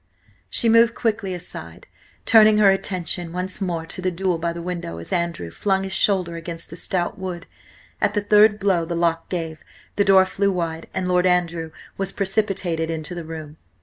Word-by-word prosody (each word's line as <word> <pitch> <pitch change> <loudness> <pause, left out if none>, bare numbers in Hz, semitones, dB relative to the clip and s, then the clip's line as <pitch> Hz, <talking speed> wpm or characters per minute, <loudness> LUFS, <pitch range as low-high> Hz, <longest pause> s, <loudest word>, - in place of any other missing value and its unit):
She 235 - 0
moved 230 +1 +5
quickly 215 -4 -1
aside, 175 0 -7 0.4
turning 215 -2 +7
her 205 -2 +6
attention 180 -3 -2
once 185 +2 -3
more 170 -4 -2
to 175 - -3
the 185 - +1
duel 180 -1 -1
by 170 +1 -1
the 170 - -6
window, 170 - -5
as 85 - -6
Andrew 170 - -2
flung 195 - 0
his 190 -1 -4
shoulder 185 -3 +2
against 165 -1 -7
the - - -7
stout 180 +3 -2
wood. 180 -2 -5 0.6
At 205 - +1
the 210 - +2
third 210 +1 +5
blow 190 -4 +2
the 170 +1 -3
lock 165 -1 0
gave, 165 -3 -4 0.3
the 205 - +4
door 190 -1 +6
flew 200 +1 0
wide, 165 -3 -3
and 185 -1 -2
Lord 180 0 +3
Andrew 170 -2 0 0.3
was 195 0 0
precipitated 195 -5 -1
into 160 +1 -4
the 175 -1 -5
room. 155 -1 -8
180 Hz, 185 wpm, -22 LUFS, 165-195 Hz, 0.6 s, turning